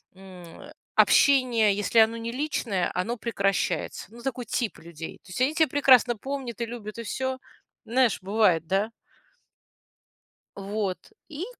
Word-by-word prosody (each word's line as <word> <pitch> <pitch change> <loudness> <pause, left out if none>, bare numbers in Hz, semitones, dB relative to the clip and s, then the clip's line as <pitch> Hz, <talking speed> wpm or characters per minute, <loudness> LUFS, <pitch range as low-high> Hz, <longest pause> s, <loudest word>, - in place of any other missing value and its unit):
м, 185 - -13 0.2
общение, 245 -7 +4
если 210 +3 +2
оно 220 +1 +5
не 230 0 -4
личное, 240 -9 -1
оно 225 +7 -2
прекращается. 200 -4 -1
Ну, 235 - -12
такой 250 -2 -4
тип 235 -4 -2
людей. 165 -1 -9
То 185 - -15
есть 215 - -4
они 275 +4 +2
тя 320 -1 +4
прекрасно 255 -4 +5
помнят 260 -2 -5
и 235 - 0
любят, 225 -2 -8
и 230 - -4
всё. 260 +3 -3 0.5
Знаешь, 245 -1 +2
бывает, 190 -4 +2
да? 200 +4 0 1.7
Вот, 200 -1 -3 0.3
и 315 +2 -5
230 Hz, 140 wpm, -26 LUFS, 195-255 Hz, 1.7 s, оно